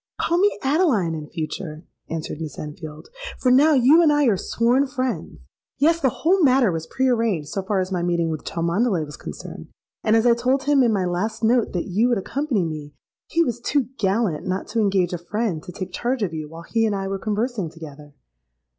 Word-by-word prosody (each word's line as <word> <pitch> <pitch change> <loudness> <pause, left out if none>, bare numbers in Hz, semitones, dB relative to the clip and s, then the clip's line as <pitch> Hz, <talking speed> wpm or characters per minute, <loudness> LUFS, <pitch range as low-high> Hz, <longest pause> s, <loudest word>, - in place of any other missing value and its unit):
—'Call 340 - +1
me 410 +2 +3
Adeline 265 - +2
in 155 -2 -6
future,' 155 0 -5 0.3
answered 160 -1 -5
Miss 155 -3 -6
Enfield; 150 0 -8 0.3
'for 255 - +2
now 295 +5 +6
you 275 +6 +6
and 315 -3 +5
I 295 -1 +3
are 225 -5 +4
sworn 240 +8 +1
friends. 260 -2 -3 0.4
Yes; 330 +4 +3
the 265 - +4
whole 365 +10 +1
matter 260 - +4
was 160 -1 -4
pre 265 0 0
arranged 225 - 0
so 195 - -2
far 195 +1 -1
as 185 0 -2
my 180 -2 -1
meeting 170 -1 0
with 155 -2 -5
Cholmondeley 170 +1 0
was 145 - -10
concerned; - - -9 0.4
and 215 - +3
as 225 +1 +3
I 240 - +6
told 255 +3 0
him 285 -1 +3
in 240 -3 +3
my 195 -4 +1
last 215 +6 -2
note 235 +1 +2
that 175 - -2
you 210 +6 +1
would 240 - +2
accompany 250 - -1
me, 150 -2 -6 0.3
he 335 - +2
was 240 -5 -2
too 265 +1 0
gallant 195 -5 0
not 185 +1 -2
to 230 - -1
engage 195 -4 +1
a 175 - -3
friend 195 -1 -2
to 180 - -9
take 185 +1 -7
charge 245 +1 -1
of 175 -5 -2
you 155 -1 -5
while 165 +1 -10
he 225 +4 +1
and 210 - -1
I 195 0 -3
were 195 0 -3
conversing 215 -2 -2
together.' 150 -3 -12
205 Hz, 215 wpm, -22 LUFS, 170-255 Hz, 0.4 s, now